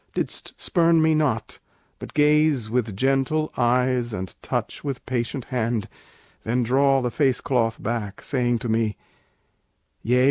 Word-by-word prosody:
didst - - -3
spurn 170 -2 +3
me 160 0 +4
not, 135 -8 0 0.4
but - - -10
gaze 150 -6 +3
With 115 -5 -1
gentle 135 +5 +1
eyes 125 -1 +1
and 95 -2 -5
touch - - -3
with 140 -4 -4
patient 125 +1 -2
hand; 115 -4 -1 0.6
Then 120 +2 0
draw 135 +2 +3
the 125 - -1
face 130 -2 +2
cloth 115 -4 0
back, 110 -3 -4
saying 120 -3 +1
to - - 0
me, 110 -1 0 1.0
'Yea! 125 +3 +2
125 Hz, 140 wpm, -24 LUFS, 115-140 Hz, 1.0 s, me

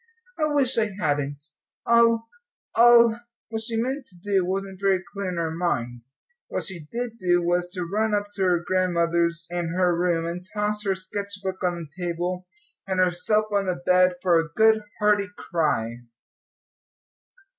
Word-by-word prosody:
"I 305 - +3
wish 265 -4 +3
I 220 -1 +1
hadn't 145 -3 -1 0.4
I'll 230 -1 +4 0.5
I'll 235 -1 +6
" - - -76
What 220 0 -3
she 225 0 -3
meant 260 +3 -2
to 180 - -17
do 195 +1 0
wasn't 190 +1 -3
very 190 -2 +2
clear 200 -2 -3
in 180 - -4
her 165 -1 -1
mind; 120 -8 -2 0.4
what - - -3
she 170 -6 -6
did 235 -1 -4
do, 175 -2 +2
was 175 +1 0
to 180 -2 -3
run 215 +4 0
up 205 0 -2
to 200 - -5
her 175 -2 +2
grandmother's 170 -2 +1
and 175 0 -2
her 180 -2 +3
room, 170 -1 +1
and 175 +2 -4
toss 210 0 -1
her 195 -1 +1
sketch 200 +2 -6
book 190 0 -4
on 180 -1 +1 0.2
the 185 - -7
table, 175 +1 -3 0.4
and 190 -1 -1
herself 185 +4 +2
on 200 -1 +1
the 180 - 0
bed, 180 +1 +3
for 175 -3 +4
a 165 0 -2
good 220 +4 +4 0.2
hearty 210 -1 +2
cry. 120 -9 -1
185 Hz, 170 wpm, -25 LUFS, 175-210 Hz, 0.5 s, I'll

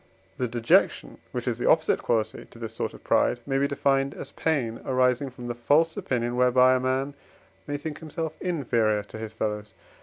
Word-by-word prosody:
The 125 - +1
dejection, 115 0 +2
which - - -4
is - - -1
the - - 0
opposite - - +3
quality 110 -2 -1
to - - -15
this 115 -1 -6
sort - - -3
of - - -15
pride, 120 - +2
may 135 -1 0
be 140 - +2
defined 140 0 +1
as - - -8
pain 125 -8 -1
arising 130 +1 +2
from 125 -1 -10
the 120 - -2
false 145 +8 +2
opinion, 120 -1 -1
whereby 125 +1 +5
a 130 - +2
man 130 +2 -1 0.5
may 145 - -2
think 150 +1 -6
himself 160 0 -4
inferior 115 - +1
to 105 +2 -10
his 110 -1 -6
fellows. 105 -1 -3
125 Hz, 190 wpm, -26 LUFS, 115-140 Hz, 0.5 s, whereby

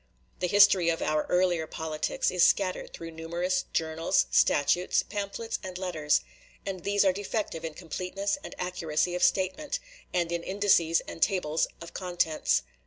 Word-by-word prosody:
The 180 - 0
history 195 -3 +6
of 165 - -1
our 155 0 0
earlier 180 -3 +2
politics 155 -1 -2
is 180 -2 +3
scattered 185 -2 +2
through 165 0 -8
numerous 170 +3 -2
journals, 160 0 +1
statutes, 175 +5 +3
pamphlets, 205 +2 -4
and 185 -1 -6
letters; 165 -5 +1 0.4
and 185 -3 -5
these 200 0 +2
are 190 - +4
defective 205 -3 -3
in 160 -2 -5
completeness 190 +6 -3
and - - -8
accuracy 180 -2 -1
of 180 - -2
statement, 200 - +1 0.3
and 175 -1 0
in 170 0 -1
indices 185 -4 +2
and - - -8
tables 165 -5 +1
of 170 - -9
contents. 160 - 0
180 Hz, 150 wpm, -28 LUFS, 165-190 Hz, 0.4 s, history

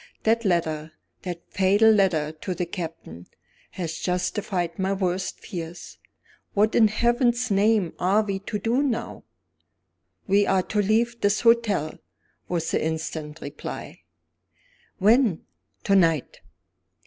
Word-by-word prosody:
"That 230 +1 +2
letter, 160 -5 -1 0.3
that 175 -2 -6
fatal 205 +3 +4
letter 180 -8 +2
to 170 +4 -5
the 180 - -2
Captain, 165 - -7 0.4
has 170 -3 -5
justified 180 -1 -2
my 190 +1 +1
worst 185 -1 -2
fears. 170 -1 -8 0.6
What 215 +2 +3
in 220 - +6
Heaven's 240 +2 +1
name 200 -2 +2
are 195 +4 +3
we 195 -2 -3
to 205 +2 -4
do 230 +6 +1
now?" 235 -5 -3 1.0
"We 200 +1 +3
are 190 -1 +2
to 210 +2 0
leave 230 +3 +1
this 205 +1 +2
hotel," 230 -9 +2 0.5
was 170 -2 -1
the - - 0
instant 160 -1 -4
reply. 145 - -7 1.0
"When?" 215 -3 +3 0.4
"To 200 - +3
night." 165 -6 +2
195 Hz, 125 wpm, -25 LUFS, 170-220 Hz, 1.0 s, in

